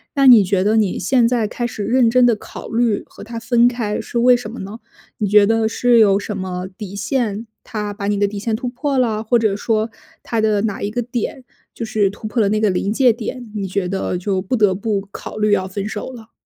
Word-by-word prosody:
那 275 -1 +4
你 235 -5 +9
觉 185 0 +1
得 215 +2 +2
你 210 -4 +1
现 235 +5 +3
在 235 -2 +1
开 240 +2 -4
始 215 -3 -5
认 240 +1 +3
真 250 +1 +4
地 235 -2 +4
考 - - -10
虑 230 -2 +1
和 - - -13
他 230 +1 -7
分 235 +1 +3
开 230 -4 -2
是 240 - -3
为 245 +1 +5
什 240 -3 -7
么 240 - -8
呢？ 205 +4 -7 0.4
你 210 - -1
觉 205 +1 +6
得 225 +1 +2
是 245 +1 +2
有 200 -2 +5
什 205 0 -5
么 185 -1 -4
底 200 -3 -7
线， 220 0 -2 0.2
他 210 -2 -4
把 200 -1 -5
你 205 0 +1
的 205 - +3
底 200 0 -6
线 220 +1 -1
突 250 +2 -3
破 275 +2 -2
了？ 220 -3 0
或 235 +2 +2
者 215 -3 +1
说 220 +1 0 0.3
他 230 - -2
的 215 -2 +2
哪 210 -3 -2
一 205 - -2
个 245 - -1
点 245 +2 -4 0.3
就 - - -6
是 210 -2 +1
突 215 - -8
破 230 - -2
了 200 - +2
那 215 +1 0
个 215 - +3
临 195 +3 -1
界 250 -1 +4
点， 235 0 -7
你 200 - -2
觉 185 -1 -2
得 190 -1 -2
就 190 +1 -1
不 225 +7 -2
得 205 -4 +3
不 200 0 -2
考 - - -8
虑 215 0 +1
要 190 -2 +2
分 200 +2 -4
手 215 +4 -5
了。 230 -2 -12
215 Hz, 265 characters per minute, -19 LUFS, 200-235 Hz, 0.4 s, 你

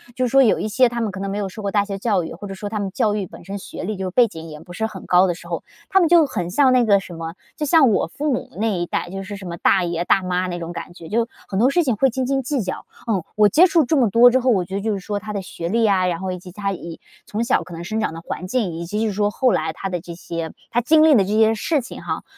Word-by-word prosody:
就 255 - +1
是 - - -1
说 270 +2 +6
有 225 - +3
一 - - -2
些 240 +4 +4
他 235 0 -4
们 225 - 0
可 185 - -7
能 195 - -3
没 205 - -3
有 205 - -2
受 215 - -9
过 200 -1 -2
大 205 -1 +2
学 200 -1 -5
教 200 -3 +1
育， 160 - -6
或 185 +5 -8
者 195 - -6
说 195 +2 -6
他 215 0 -3
们 195 -2 -3
教 215 -1 +1
育 205 -2 -2
本 - - -13
身， 200 +1 -5
学 195 - -8
历 215 - -3
就 185 -1 -3
背 240 +5 +5
景 165 -5 -9
也 150 - -9
不 175 +3 -12
是 220 - -2
很 210 -4 -7
高 180 +1 +5
的 175 - 0
时 - - -13
候， - - -4 0.3
他 385 - +4
们 345 - +4
就 335 -2 +6
很 180 -10 -3
像 265 +7 +4
那 250 -1 +4
个 200 -2 +5
什 180 - -10
么， 165 0 -6 0.2
就 300 - -1
像 295 -3 +5
我 195 - +1
父 290 - -2
母 - - -4
那 215 -3 0
一 175 - -1
代， 175 - -3
就 195 +1 -5
是 205 +2 -7
什 195 - -10
么 170 0 -5
大 185 +2 +3
爷 170 -1 -1
大 195 - +3
妈 180 0 -1
那 175 -1 -4
种 170 0 -5
感 170 0 -7
觉， 165 -2 -11
就 230 +4 0 0.2
很 190 - -3
多 245 +4 +5
事 345 +5 +2
情 255 -7 +1
会 265 +6 +3
斤 255 +1 -2
斤 270 +1 0
计 275 0 -1
较， 185 - -5 0.2
嗯。 200 -6 0
我 210 0 +6
接 315 - +6
触 335 -3 +3
这 315 - +1
么 250 -6 +3
多 235 +5 +7
之 260 - +3
后， 255 - +1
我 190 -6 +1
觉 190 - -6
得 200 - -2
就 220 - -1
是 195 - -3
说 205 +2 -4
他 210 +1 -7
的 200 - -2
学 170 -2 -6
历 225 +2 +2
啊， 185 -2 +3
然 170 -2 -1
后 190 0 -3
以 180 - -5
及 180 0 -12
他 195 +1 -3
以 170 -2 -8 0.3
从 215 - -3
小 245 - +1
可 180 - -12
能 165 +1 -6
生 215 +5 -2
长 - - -1
的 165 - -8
环 180 +1 -6
境， 205 -4 -1
以 170 +1 -5
及 210 +5 -3
就 225 - +1
是 210 - -2
说 205 +1 +1
后 255 +2 +2
来 160 +1 0
他 195 - -5
的 180 -2 -3
这 170 0 -9
些 165 -1 -5 0.2
他 240 - +2
经 310 +5 +5
历 315 -2 +6
的 205 - +5
这 195 - -4
些 220 0 +4
事 305 +7 0
情 250 - -9
哈， - - -3
200 Hz, 360 characters per minute, -21 LUFS, 180-235 Hz, 0.3 s, 多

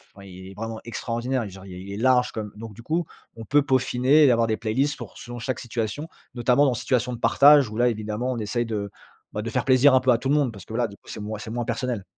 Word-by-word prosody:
enfin, 100 0 -13
il 95 0 -11
est - - -11
vraiment 115 +1 -5
extraordinaire. 120 +2 -2
Et 105 - -6
genre, 95 0 -12
il 95 - -10
il 95 +2 -8
est 100 - -5
large 125 +1 +3
comme 105 -2 -6
donc, 110 0 -9
du 115 - -12
coup, 160 +7 -1 0.3
on 115 - -8
peut 145 +5 +3
peaufiner 130 +2 +3
et 135 - +6
avoir 115 -1 +2
des 110 - +1
playlists 130 +6 0
pour - - -10
son 120 -2 -8
chaque 125 +1 -3
situation, 120 +5 -4 0.3
notamment 125 +3 +3
dans 135 - +3
des 120 - -3
situations 125 0 0
de 120 - -7
partage, 140 -3 +6
où 110 - -8
là, 120 +1 +4
évidemment, 110 +2 -3
on 120 - -3
essaye, 120 +3 -1
de, 105 -3 -3 0.4
bah, 105 - -3
de 115 - -4
faire - - 0
plaisir 130 +1 +5
un 130 - +6
peu 130 - -1
à 120 - +4
tout 125 - -4
le 145 - +3
monde 140 -5 +2
parce 100 -3 -12
que 110 - -10
voilà, 120 0 +1
du 100 - -12
coup, - - -29
c'est - - -7
moins 105 +1 -5
c'est 110 - -7
moins 120 0 -2
personnel. 125 -5 -2
120 Hz, 285 wpm, -24 LUFS, 110-130 Hz, 0.4 s, et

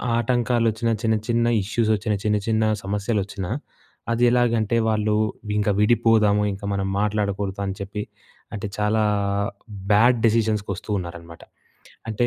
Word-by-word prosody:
ఆటంకాలొచ్చినా, 120 -1 +1
చిన్న 110 -1 +2
చిన్న 120 0 +2 0.2
ఇష్యూసొచ్చినా, 110 0 0
చిన్న 105 0 +2
చిన్న 110 0 +2 0.2
సమస్యలొచ్చినా, 100 -1 -2 0.6
అదెలాగంటే, 120 -2 +2
వాళ్ళు 105 -1 +1 0.4
ఇంక 105 0 +1
విడిపోదాము, 110 -2 +3
ఇంక 100 +2 -10
మనం 95 0 -1
మాట్లాడకూడదు 100 -1 -1
అని 95 - -3
చెప్పి, 100 +1 -4 0.5
అంటే 105 0 -4
చాలా 105 +1 +1 0.9
బ్యాడ్ 120 +4 +5
డిసిషన్స్‌కొస్తూ 110 -2 0
ఉన్నారనమాట. 85 -2 -8 0.7
అంటే 120 +3 +1
105 Hz, 110 wpm, -23 LUFS, 100-115 Hz, 0.9 s, బ్యాడ్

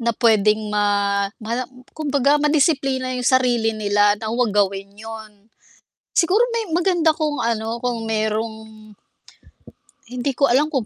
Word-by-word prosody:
na 235 -1 -1
pwedeng 215 -2 +2
ma 200 -1 +1 0.2
ma 235 +3 -2 0.3
kumbaga 285 -1 +1
ma-disiplina 275 -4 +1
yung 245 - -3
sarili 245 -4 +2
nila 205 0 +2
na 220 +1 -5
wag 240 -1 +1
gawin 200 0 -1
yun. 220 -1 -11 0.7
Siguro 375 +7 +3
may 455 -7 -3
maganda 345 -2 +2
kung 300 -2 -2
ano, 230 0 -2
kung 240 -1 -3
merong 220 0 -1 1.5
hindi 250 +3 -3
ko 280 - +4
alam 280 +5 +2
kung 265 -7 -2
235 Hz, 135 wpm, -21 LUFS, 215-280 Hz, 1.5 s, ko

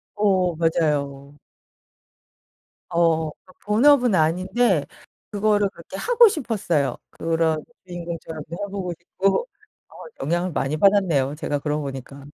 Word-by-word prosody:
어 190 -4 +2
맞아요. 145 -4 -1 1.5
어, 165 -2 +2
그러니까 185 +4 -21
본업은 245 +1 +4
아닌데 180 +2 +2 0.5
그거를 205 -1 +2
그렇게 170 +1 -11
하고 480 - +5
싶었어요. 210 - -1
그런 165 -1 0 0.2
주인공처럼도 170 -3 -7 0.2
해보고 190 -3 -4
싶고 195 - 0 0.4
어 - - -19 0.3
영향을 175 +3 -1
많이 145 0 -1
받았네요, 165 -8 +3
제가 145 -1 -2
그러고 150 +1 -2
보니까. 135 0 -8
170 Hz, 280 characters per minute, -23 LUFS, 155-200 Hz, 1.5 s, 하고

